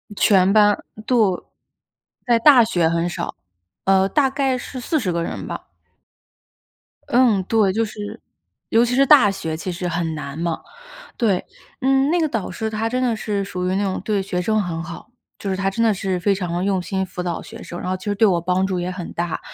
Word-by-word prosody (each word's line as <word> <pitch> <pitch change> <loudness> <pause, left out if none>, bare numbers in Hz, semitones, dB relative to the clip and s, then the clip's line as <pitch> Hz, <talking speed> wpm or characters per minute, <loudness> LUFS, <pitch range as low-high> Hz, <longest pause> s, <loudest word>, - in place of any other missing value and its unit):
全 195 -2 +4
班， 210 -1 +5 0.3
对 250 - +2 1.1
在 235 -2 +3
大 255 -2 +7
学 175 -7 +1
很 170 +1 0
少， - - -5 0.5
呃， 190 0 +4
大 270 +4 +3
概 270 -2 0
是 255 +1 -7
40 245 - -1
个 170 0 -1
人 - - -5
吧。 - - -7 1.4
嗯， 235 -5 +4
对， 210 -3 +2
就 225 +1 +1
是 210 -1 -7 0.5
尤 230 +2 +4
其 245 +1 -1
是 275 +1 +5
大 255 -9 +7
学 160 -4 -4
其 180 +3 -4
实 175 +1 -4
很 170 -1 -2
难 140 0 -6
嘛， 170 -1 -2 0.6
对。 205 -7 +1 0.4
嗯， 270 +2 +3
那 350 - +2
个 315 - +2
导 225 -8 -3
师 220 +4 -3
她 220 +1 -2
真 255 +2 -1
的 240 -3 +1
是 205 -2 -2
属 180 -2 -3
于 185 - 0
那 200 - 0
种 190 -1 -2
对 205 -2 0
学 180 -2 -2
生 215 +3 +1
很 165 -3 -3
好， 170 +6 -9 0.3
就 200 - -4
是 190 - 0
她 195 0 -1
真 230 +4 -1
的 225 - +4
是 190 -1 -2
非 200 +2 +2
常 180 -3 -3
地 175 +2 -1
用 195 -2 +1
心 190 +1 -2
辅 180 0 -6
导 175 -2 -3
学 - - -11
生， 175 - -7
然 - - -4
后 185 - -1
其 - - -14
实 205 - 0
对 220 +1 +4
我 175 -3 +2
帮 185 +2 +1
助 185 -2 -1
也 175 - -2
很 180 -2 -6
大。 170 -1 -2
195 Hz, 225 characters per minute, -21 LUFS, 180-225 Hz, 1.4 s, 大